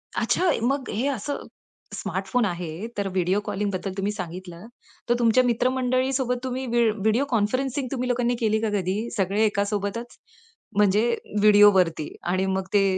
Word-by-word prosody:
अच्छा, 365 Hz, -2 st, +2 dB
मग 270 Hz, +2 st, 0 dB
हे 245 Hz, +7 st, -1 dB
असं 280 Hz, +1 st, -3 dB, 0.5 s
स्मार्टफोन 195 Hz, +5 st, -1 dB
आहे, 175 Hz, +1 st, -4 dB
तर 200 Hz, -1 st, -1 dB
व्हिडिओ 185 Hz, +1 st, +1 dB
कॉलिंगबद्दल 195 Hz, -1 st, -2 dB
तुम्ही 195 Hz, +1 st, -1 dB
सांगितलं, 180 Hz, -1 st, -7 dB, 0.4 s
तर -, -, +5 dB
तुमच्या 235 Hz, +2 st, +4 dB
मित्रमंडळीसोबत 255 Hz, +1 st, +1 dB
तुम्ही 260 Hz, 0 st, -3 dB
व्ही 235 Hz, -1 st, +3 dB
व्हिडिओ 220 Hz, +5 st, +1 dB
कॉन्फरन्सिंग 255 Hz, +4 st, 0 dB
तुम्ही 255 Hz, -2 st, -2 dB
लोकांनी 245 Hz, 0 st, +1 dB
केली 220 Hz, -1 st, +1 dB
का 225 Hz, -, 0 dB
कधी? 200 Hz, +4 st, -1 dB
सगळे 200 Hz, +2 st, +1 dB
एकासोबतच, 205 Hz, +2 st, -2 dB, 0.6 s
म्हणजे 210 Hz, +3 st, +3 dB, 0.3 s
व्हिडिओवरती 200 Hz, -7 st, +5 dB, 0.2 s
आणि 185 Hz, +1 st, +1 dB
मग 190 Hz, 0 st, -1 dB
ते 200 Hz, -1 st, +5 dB
210 Hz, 140 wpm, -24 LUFS, 195-245 Hz, 0.6 s, तर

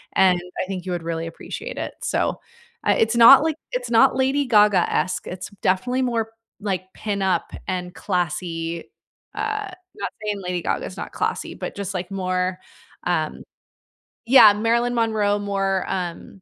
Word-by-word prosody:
and 185 Hz, -2 st, +5 dB, 0.2 s
I -, -, -1 dB
think 185 Hz, -2 st, -5 dB
you 185 Hz, -, -3 dB
would 175 Hz, -2 st, -4 dB
really 165 Hz, 0 st, -3 dB
appreciate 165 Hz, -, -7 dB
it. -, -, -4 dB
So, -, -, 0 dB, 0.5 s
uh, -, -, +5 dB
it's 225 Hz, +2 st, +2 dB
not, 255 Hz, +5 st, +9 dB
like 320 Hz, -1 st, 0 dB, 0.2 s
It's 245 Hz, -1 st, -3 dB
not 245 Hz, +4 st, +5 dB
Lady 265 Hz, +2 st, +1 dB
Gaga-esque, 205 Hz, -5 st, +3 dB
it's 180 Hz, -, -6 dB
m 200 Hz, -, -19 dB
definitely 245 Hz, +8 st, +1 dB
more, 230 Hz, -3 st, -1 dB, 0.3 s
like, 190 Hz, -3 st, -2 dB
pin-up 195 Hz, -4 st, -1 dB, 0.2 s
and 180 Hz, -1 st, -3 dB
classy. 170 Hz, -2 st, -2 dB, 0.5 s
Uh 425 Hz, -1 st, -2 dB, 0.2 s
not 420 Hz, -, -3 dB
saying 205 Hz, -2 st, -2 dB
Lady 180 Hz, -1 st, -2 dB
Gaga's -, -, -3 dB
not -, -, -6 dB
classy, -, -, -2 dB
but -, -, -6 dB
just, 200 Hz, -1 st, -4 dB
like, 180 Hz, 0 st, -4 dB
more, 185 Hz, -1 st, -1 dB, 0.5 s
um -, -, -1 dB, 0.9 s
yeah, 240 Hz, -5 st, +9 dB
Marilyn 235 Hz, +3 st, +1 dB
Monroe 215 Hz, -3 st, +1 dB
more, 195 Hz, -2 st, -1 dB
um, 180 Hz, +1 st, -5 dB
200 Hz, 155 wpm, -23 LUFS, 180-230 Hz, 0.9 s, not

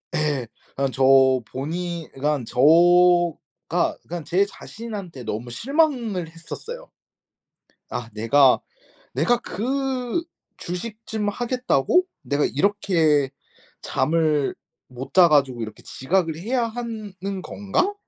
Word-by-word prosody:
예. 150 Hz, -6 st, 0 dB, 0.3 s
그냥 135 Hz, -1 st, 0 dB
저 135 Hz, -, -1 dB, 0.5 s
본인 170 Hz, +4 st, -4 dB
그러니깐 145 Hz, -1 st, -1 dB
저 125 Hz, +2 st, -6 dB, 1.1 s
가 175 Hz, +1 st, +1 dB
그러니깐 170 Hz, -2 st, -6 dB
제 180 Hz, +6 st, +2 dB
자신한테 200 Hz, -, -8 dB
너무 115 Hz, +3 st, -4 dB
실망을 240 Hz, -, 0 dB
했었어요. 460 Hz, -, -9 dB, 1.0 s
'아 120 Hz, -2 st, -5 dB
내가 125 Hz, +5 st, +4 dB, 0.6 s
내가 240 Hz, 0 st, +2 dB
그 260 Hz, -, -2 dB, 0.4 s
주식 210 Hz, +6 st, -5 dB
좀 210 Hz, -2 st, -2 dB
하겠다고 250 Hz, -, +1 dB, 0.2 s
내가 145 Hz, +1 st, 0 dB
이렇게 160 Hz, -5 st, +2 dB, 0.5 s
잠을 150 Hz, +1 st, +1 dB, 0.3 s
못 125 Hz, +1 st, -9 dB
자 180 Hz, -2 st, +8 dB
가지고 135 Hz, -6 st, +2 dB
이렇게 110 Hz, -1 st, -7 dB
지각을 165 Hz, +3 st, -1 dB
해야 235 Hz, +7 st, -1 dB
하는 225 Hz, -3 st, -6 dB, 0.3 s
건가?' 365 Hz, -, -1 dB
175 Hz, 220 characters per minute, -23 LUFS, 140-230 Hz, 1.1 s, 자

